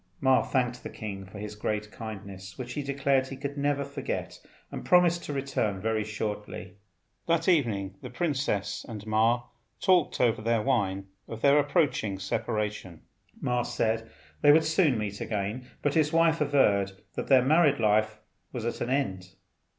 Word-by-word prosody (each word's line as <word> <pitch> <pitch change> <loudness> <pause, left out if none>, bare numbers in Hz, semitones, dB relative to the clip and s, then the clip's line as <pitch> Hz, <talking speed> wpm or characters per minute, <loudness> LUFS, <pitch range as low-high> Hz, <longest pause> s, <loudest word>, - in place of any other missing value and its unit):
Ma 130 -3 +4
thanked 125 -2 -1
the - - -7
king 100 -3 -7
for 95 - -11
his 105 0 -6
great 105 0 -3
kindness, 100 -4 -8
which 125 -1 -6
he 145 - -2
declared 140 -1 +1
he 135 - -7
could 140 +1 -5
never 140 -1 0
forget, 140 -1 -5 0.3
and - - -6
promised 175 -1 +4
to - - -5
return 135 -8 -1
very 110 +1 0
shortly. 105 -2 -5 0.5
That 165 0 +1
evening 110 - +2
the 125 - -7
princess 125 - -1
and 105 -2 -7
Ma 115 +3 +2 0.4
talked 180 -5 +3
over 115 -3 +2
their 115 -1 +1
wine 100 -7 0 0.2
of 115 0 -8
their 140 +1 +6
approaching 145 - +1
separation. 105 -3 -3 0.4
Ma 125 0 +1
said 115 -1 -1 0.3
they 145 - +7
would 160 +2 +5
soon 160 - +3
meet 105 -1 -4
again; 110 +4 -3 0.2
but 145 - +1
his 155 -2 +2
wife 165 -1 +3
averred 105 -10 +3 0.2
that - - -4
their 130 -2 +5
married 150 -1 +4
life 110 0 +2 0.3
was 120 -3 -5
at 120 - -3
an 120 - -1
end. 95 -9 -2
120 Hz, 165 wpm, -28 LUFS, 105-140 Hz, 0.5 s, they